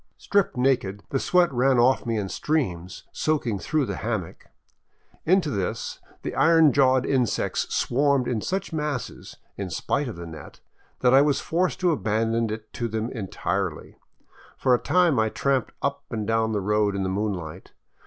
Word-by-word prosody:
Stripped 200 -9 0
naked, 120 -7 +1
the 135 - +1
sweat 175 -2 +2
ran 130 +1 +3
off 125 +1 +3
me 115 -1 0
in 100 -2 -2
streams, 95 - -2
soaking 130 -10 -1
through 150 +4 0
the - - -4
hammock. 110 -7 -4 0.8
Into 180 -3 +3
this 100 -6 -3 0.2
the - - -4
iron 160 -3 +5
jawed 130 -2 +3
insects 130 -4 0
swarmed 140 0 +1
in 115 -4 -1
such 190 - -3
masses, 150 -5 -4 0.2
in 100 -2 -4
spite 140 +10 -1
of 115 - -6
the 85 0 -8
net, 80 -1 -11 0.4
that 125 0 +4
I 135 - +8
was 145 -1 +2
forced 170 -3 -1
to 180 -1 +3
abandon 115 -3 0
it 110 0 -7
to 120 - -2
them 110 +1 -3
entirely. 105 -7 -4 0.6
For 130 - +2
a 120 - +3
time 175 -8 +3
I 110 0 +2
tramped 135 0 0
np 140 0 0
and 110 -3 -3
down 115 0 +1
the 105 -2 -1
road 105 0 +1
in 100 - -1
the - - -1
moonlight. 95 -4 -4
120 Hz, 170 wpm, -25 LUFS, 105-140 Hz, 0.8 s, I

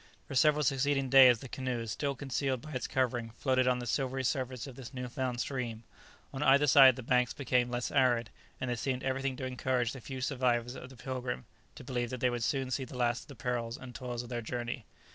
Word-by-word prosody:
For - - -7
several 150 +3 +4
succeeding 135 -1 +1
days 130 -3 +9
the 135 - -7
canoe, 125 -2 -3
still 140 +5 -2
concealed 135 -1 -2
by 155 - -10
its 130 - -2
covering, 120 -3 0
floated 130 -2 +2
on 125 -1 +3
the 120 - -5
silvery 130 +1 -1
surface 130 -2 -2
of 135 -3 -9
this 130 +1 -10
new 125 -1 -4
found 125 0 -3
stream. 120 -4 -3 0.5
On 135 - -4
either 140 0 +5
side 135 -2 +8
the 130 - -7
banks 125 +1 +2
became 125 -3 +1
less 120 0 -2
arid, 125 -5 +2 0.3
and 130 - -3
there 120 -1 -1
seemed 130 +1 -2
everything 135 0 -1
to 130 - -4
encourage 125 -1 0
the 130 - -8
few 130 +2 -6
survivors 125 -2 0
of 130 -1 -9
the 130 - -14
"Pilgrim" 125 - -4 0.3
to - - -10
believe 120 -2 -2
that 130 - -5
they 125 0 +2
would 120 -1 -3
soon 135 +1 -1
see 135 - -1
the 125 0 -8
last 120 0 0
of - - -32
the 140 - -11
perils 115 +1 -2
and 130 -2 -10
toils 125 -2 -5
of 120 - -11
their 120 -1 -3
journey. 120 0 -4
130 Hz, 230 wpm, -31 LUFS, 120-135 Hz, 0.5 s, days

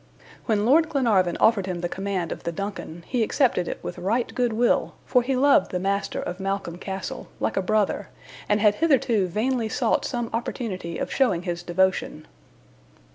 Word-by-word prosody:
When 210 -3 +2
Lord 310 +6 +4
Glenarvan 215 - +2
offered 210 -4 +3
him 180 -2 -3
the 175 - -1
command 190 -2 -3
of - - -5
the 170 - -3
DUNCAN, 175 -2 -6
he 245 -2 -1
accepted 225 -5 +2
it - - -3
with 180 - -6
right 220 +7 0
good 245 -2 +1
will, 235 +2 +1
for 250 - +3
he 260 +2 -1
loved 275 -6 +4
the 180 - -2
master 195 +2 -1
of 180 - -5
Malcolm 195 -3 -3
Castle, 190 -1 -5
like - - -1
a 195 - +2
brother, 210 +2 0 0.4
and 210 0 +3
had 210 -1 +5
hitherto 245 - +2
vainly 225 +4 -1
sought 235 -1 +1
some 240 -3 -3
opportunity 205 -7 -3
of - - -3
showing 235 -11 +2
his 175 -1 -3
devotion. 190 +2 0
205 Hz, 180 wpm, -25 LUFS, 185-240 Hz, 0.4 s, had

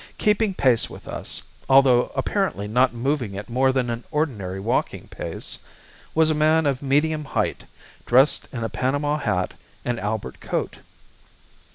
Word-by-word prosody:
Keeping 210 -1 +2
pace 125 -7 +3
with - - -12
us, - - -4 0.3
although 135 -2 +5
apparently 100 +5 -1
not 125 +4 +3
moving 120 -4 -2
at 105 +4 -7
more 130 +2 +3
than 130 -2 0
an 115 +1 -4
ordinary 105 - -2
walking 110 +5 -1
pace, - - -5 0.6
was 160 0 +4
a - - +3
man 155 +1 +3
of 135 -3 0
medium 150 +3 +1
height, 140 - -2 0.4
dressed 130 +4 +4
in 115 -4 -4
a - - 0
panama 145 +3 0
hat 90 -8 -1 0.3
and 120 -1 -1
albert 105 -11 -3
coat. - - -3
130 Hz, 150 wpm, -23 LUFS, 115-150 Hz, 0.6 s, although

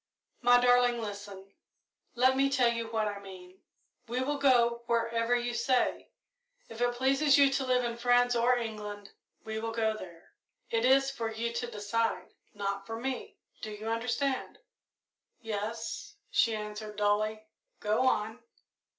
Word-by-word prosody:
"My 245 0 +6
darling, 245 -1 +4
listen 200 -2 -8 0.6
let 260 +2 +4
me 275 +1 +3
tell 250 -4 +3
you 230 -1 -3
what 220 -1 -1
I 205 -1 -4
mean. 190 -1 -12 0.5
We 245 +2 -2
will 290 +2 -2
go 235 -4 +3
wherever 230 0 +1
you 240 0 -1
say. 255 +1 0 0.6
If 225 +1 -9
it 245 0 +1
pleases 270 +3 +3
you 280 -1 +6
to 270 0 0
live 250 -1 +2
in 235 -1 -3
France 245 0 +3
or 245 +1 +3
England, 210 -3 -6 0.3
we 220 0 -3
will 225 +1 -3
go 220 -1 0
there 170 -5 -12 0.4
it 230 +1 +1
is 270 +1 +4
for 230 -4 -3
you 230 +1 -3
to 240 0 -3
decide, 225 +1 -2 0.2
not 200 -1 -3
for 225 0 -5
me. 260 +1 -4 0.2
Do 215 - -5
you 215 +1 -6
understand?" 245 +4 -1 0.8
"Yes," 225 +1 -5 0.2
she 225 -1 +3
answered 210 0 -6
dully. 215 +1 0 0.3
"Go 220 +5 +1
on." 220 -1 0
230 Hz, 150 wpm, -30 LUFS, 215-245 Hz, 0.8 s, My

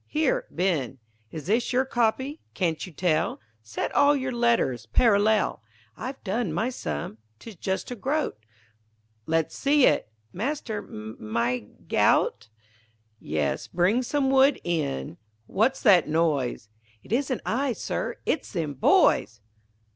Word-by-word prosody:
Here - - 0
Ben, 155 -9 -1 0.3
Is 155 -3 -7
this 225 +6 +1
your 260 +1 +2
copy? 260 +4 0
Can't 165 -5 -1
you - - -11
tell? 165 0 0 0.2
Set 110 0 -4
all 285 +1 +5
your 260 -1 -2
letters 235 - +1
parallel. 210 - +3 0.3
I've 260 +3 -7
done 210 -1 -1
my 220 +11 -1
sum 75 - -5 0.2
'tis 225 - -11
just 190 +6 -3
a - - -3
groat 270 - -2 0.9
Let's 160 0 0
see 285 -1 +4
it. 110 - +2 0.2
Master, 225 - -3
m' 110 - -7
I 120 -2 0 0.2
g' - - -3
out? 105 - +2 0.7
Yes, 75 -2 -2
bring 185 +8 +2
some 270 +1 0
wood 270 +1 +5
in 140 - -2 0.3
What's 230 - 0
that 185 - +6
noise? 150 -8 0 0.4
_It - - -15
isn't 255 +1 0
I, 260 +2 0
Sir, - - -3
it's - - -1
them 160 -6 -2
boys. 135 - +3
200 Hz, 135 wpm, -26 LUFS, -, 0.9 s, that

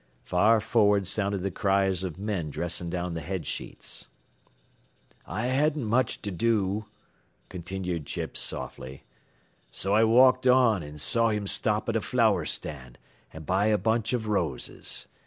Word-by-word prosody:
Far 105 +5 +3
forward 105 -3 +2
sounded 100 -1 -1
the 100 - -1
cries 95 0 +1
of 90 -3 -4
men 95 -6 -3
dressing 85 +3 -3
down 90 0 -3
the 80 - -4
head 95 0 -4
sheets. - - -6 1.2
"I 110 - -3
hadn't 145 +3 +1
much 120 +3 0
to 100 - -3
do," 105 +1 0 0.6
continued 90 -3 -4
Chips, - - -4
softly, 65 +1 -5 0.7
"so 95 +1 -1
I 110 +2 +5
walked 130 +3 +5
on 125 -6 +5
an' 75 0 -9
saw 115 +9 +2
him 105 -2 -1
stop 105 +2 0
at 115 - -1
a 115 - +1
flower 110 -10 +2
stand 65 -5 -5 0.3
an' 80 - -9
buy 95 +7 +1
a 110 -1 +3
bunch 115 +1 0
av 120 -3 -1
roses. 85 -11 -2
100 Hz, 150 wpm, -27 LUFS, 90-115 Hz, 1.2 s, I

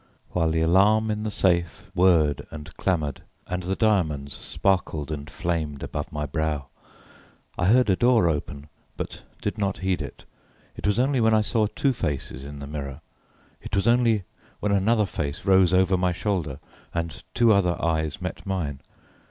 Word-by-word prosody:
while 80 -2 +1
the 80 0 +1
alarm 105 +6 +4
in 105 0 -2
the 110 - -2
safe 95 +1 0
whirred 80 -6 +4
and 75 -1 -9
clamoured, 75 -7 -1 0.2
and 90 0 -3
the 95 +2 -2
diamonds 80 - +1
sparkled 80 -6 -1
and 75 -1 -5
flamed 80 -7 -2
above 75 - -4
my 75 -1 -3
brow. 75 -2 -2 0.9
I 90 - 0
heard 125 +4 +5
a 95 - +4
door 120 -3 +4
open 75 -2 -3 0.3
but - - -5 0.2
did 105 +1 -2
not 100 -1 0
heed 90 -4 +1
it. 70 - -8 0.5
It - - -3
was 105 - +2
only 130 0 +2
when 110 0 +4
I 110 - +4
saw 110 0 +1
two 135 +5 0
faces 70 - -3
in 70 +1 -8
the 70 - -7
mirror: 70 -1 -6 0.6
it - - -4
was 100 - +1
only 115 -3 +3 0.4
when 105 - 0
another 105 +2 +3
face 75 -2 -4
rose 95 -2 +5
over 95 0 +4
my 90 0 +1
shoulder, 90 - -2 0.4
and 85 -2 -3
two 115 -2 +5
other 90 -3 +2
eyes 80 -2 0
met - - -5
mine. 85 -8 -3
90 Hz, 170 wpm, -25 LUFS, 75-105 Hz, 0.9 s, heard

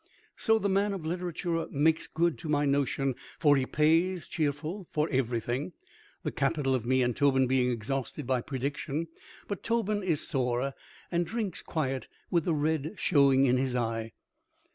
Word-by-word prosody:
So, 225 -1 +3
the 205 - 0
man 200 +1 +2
of 180 -5 -5
literature 175 0 -2
makes 155 +3 +2
good, 170 0 0
to 160 - -6
my 145 -1 +2
notion, 140 -1 +1 0.2
for 145 -3 +5
he 130 -2 0
pays, 165 +4 +2
cheerful, 160 +4 -2
for 150 0 0
everything, 125 +3 -1 0.5
the - - -1
capital 140 -1 0
of 120 -3 -1
me 130 0 +3
and 120 -1 0
Tobin 135 -2 +3
being 125 0 +2
exhausted 130 +4 -3
by 130 -1 +1
prediction. 140 +4 -3 0.4
But 200 - -4
Tobin 215 -3 0
is 170 -6 +1
sore, 130 -1 0 0.4
and 170 0 +2
drinks 210 -1 -3
quiet, 135 -5 -2 0.2
with 170 -3 +2
the 170 - +1
red 155 +3 0
showing 140 -5 +4
in 130 -1 +3
his 130 -1 0
eye. 115 -2 -2
145 Hz, 165 wpm, -29 LUFS, 130-170 Hz, 0.5 s, for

